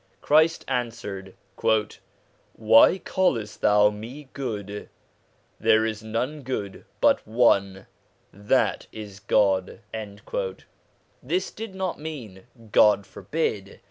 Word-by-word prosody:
Christ 160 +2 +3
answered: 115 -7 -4 0.5
' - - -19 0.4
Why 110 - +6
callest 115 - -1
thou 105 0 +5
me 125 +7 -9
good? 105 -6 -5 0.7
there 110 0 +4
is 110 -1 -3
none 120 +7 -3
good 110 -7 -5
but - - +4
one, 100 -4 +2 0.5
that 105 +1 0
is 105 -3 -9
God.' 95 -2 +1 1.4
This 370 - -2
did 220 -3 -8
not 190 -1 -3
mean 125 -12 -8 0.3
God 100 -1 +5
forbid 100 -3 -3
110 Hz, 100 wpm, -25 LUFS, 100-135 Hz, 1.4 s, Why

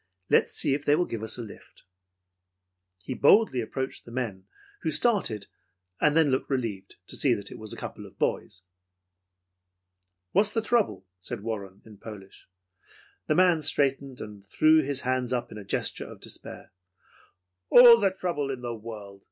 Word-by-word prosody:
Let's - - +3
see - - +1
if 140 +1 -2
they 145 - +4
will 175 - +1
give 115 -8 -5
us 110 - -2
a 120 - -5
lift." 105 - -14 1.2
He - - -4
boldly 140 - +4
approached 130 +4 -5
the 120 - -13
men, 105 -7 -4 0.3
who 160 - -1
started, 155 - +1 0.6
then 150 -1 +4
looked 130 - -1
relieved 110 -8 -3
to - - -8
see 130 -5 +3
that 100 -1 -6
it - - -9
was 110 -1 -3
a - - -1
couple - - -7
of - - -19
boys. 90 - -2 1.7
"What's 200 +2 +3
the 225 +1 -2
trouble?" 210 - 0
said 90 - -6
Warren 100 -4 -6
in 105 -3 -15
Polish. 100 -5 -12 0.8
The - - +2
man 180 -3 +4
straightened, 135 -2 -1
and 105 -2 -9
threw 155 +7 +4
his 140 -2 -3
hands 130 -1 -1
up 125 -1 -2
in 105 - -8
a - - -9
gesture 100 - -3
of - - -12
despair. - - -10 1.0
"All 240 -1 +9
the 200 - +3
trouble 175 -7 -3
in 130 -2 -4
the 120 -1 -3
world!" 105 -3 -9
130 Hz, 170 wpm, -27 LUFS, 105-155 Hz, 1.7 s, All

